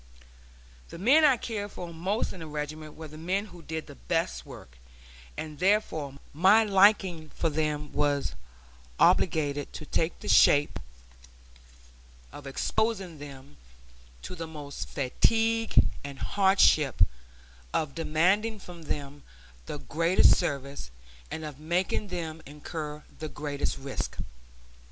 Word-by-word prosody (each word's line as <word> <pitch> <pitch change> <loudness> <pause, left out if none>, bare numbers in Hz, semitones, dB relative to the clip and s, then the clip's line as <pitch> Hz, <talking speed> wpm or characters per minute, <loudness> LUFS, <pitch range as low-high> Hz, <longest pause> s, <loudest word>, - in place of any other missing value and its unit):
The - - -9
men 265 - +5
I 275 -4 +6
cared 210 -3 -4
for 175 -1 -7
most 190 +7 -1
in 185 - -10
the 160 - -7
regiment 150 +1 -6
were 160 0 -8
the 155 +1 -11
men 185 +5 -1
who 175 -4 -13
did 160 0 -5
the - - -11
best - - -2
work; - - -12 0.6
and 155 -2 -6
therefore 180 -8 +1 0.2
my 190 +8 +6
liking 195 -5 +3
for 165 - -1
them 150 -1 -2
was 145 -1 0 0.7
obliged 145 -4 +2
to 155 - -7
take 160 +3 -1
the - - -9
shape 145 0 +5 1.5
of 145 -1 -10
exposing 190 +2 -1
them 140 0 -11 0.7
to - - -6
the 165 -2 -6
most 145 -3 -7
fatigue 225 - +1 0.3
and 140 -1 -7
hardship, 160 - +4 0.7
of 150 - -1
demanding 185 +8 +1
from 180 -4 -11
them 145 -1 -5 0.5
the - - -4
greatest 165 +5 +4
service, 140 - -3 0.4
and 160 - -5
of 150 -2 -8
making 175 +6 -1
them 165 -3 -5
incur 150 +1 -6 0.2
the 155 - -4
greatest 145 -1 -3
risk. 135 0 -5
160 Hz, 130 wpm, -28 LUFS, 145-190 Hz, 1.5 s, I